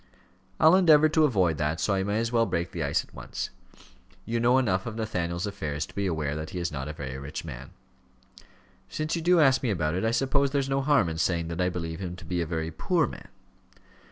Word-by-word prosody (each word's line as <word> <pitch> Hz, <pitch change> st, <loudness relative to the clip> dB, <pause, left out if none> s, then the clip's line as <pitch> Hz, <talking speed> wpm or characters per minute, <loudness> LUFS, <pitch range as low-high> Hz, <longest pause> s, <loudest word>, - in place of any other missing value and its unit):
"I'll 160 Hz, +3 st, +7 dB
endeavour 155 Hz, -5 st, +6 dB
to 155 Hz, 0 st, +4 dB
avoid 95 Hz, -, +1 dB
that, 75 Hz, +3 st, -1 dB
so 100 Hz, -, +1 dB
I 95 Hz, -, +1 dB
may 100 Hz, +2 st, -1 dB
as 115 Hz, +1 st, -1 dB
well 115 Hz, -1 st, +2 dB
break 85 Hz, +2 st, -2 dB
the 85 Hz, -, -5 dB
ice 70 Hz, -, +1 dB
at -, -, -22 dB
once. -, -, -6 dB, 0.7 s
You 115 Hz, +1 st, -1 dB
know 120 Hz, +2 st, +4 dB
enough 95 Hz, -7 st, +1 dB
of 110 Hz, -, -5 dB
Nathaniel's 90 Hz, -6 st, -2 dB
affairs 75 Hz, -8 st, -3 dB
to -, -, -17 dB
be 100 Hz, -1 st, -1 dB
aware 75 Hz, -4 st, -2 dB
that 80 Hz, 0 st, -5 dB
he -, -, -7 dB
is 85 Hz, 0 st, -2 dB
not 70 Hz, -1 st, -4 dB
a 75 Hz, -, -5 dB
very 65 Hz, -3 st, -6 dB
rich 70 Hz, +4 st, -6 dB
man." 65 Hz, -6 st, -8 dB, 1.2 s
"Since 155 Hz, +2 st, -2 dB
you 170 Hz, -, -2 dB
do 175 Hz, +1 st, +4 dB
ask 135 Hz, -4 st, +5 dB
me 125 Hz, -, -1 dB
about 80 Hz, -6 st, 0 dB
it, 95 Hz, -, -1 dB
I 110 Hz, -, +2 dB
suppose 135 Hz, +4 st, +1 dB
there's 140 Hz, -1 st, 0 dB
no 135 Hz, 0 st, 0 dB
harm 140 Hz, -, +3 dB
in 80 Hz, 0 st, -4 dB
saying 85 Hz, -1 st, 0 dB
that 85 Hz, +2 st, -3 dB
I 90 Hz, -, +2 dB
believe 85 Hz, -2 st, -5 dB
him 90 Hz, -2 st, -5 dB
to 90 Hz, -, -12 dB
be 90 Hz, +1 st, -2 dB
a 85 Hz, -, -2 dB
very 80 Hz, 0 st, -3 dB
poor 80 Hz, -, +1 dB
man." -, -, -9 dB
95 Hz, 240 wpm, -27 LUFS, 80-130 Hz, 1.2 s, I'll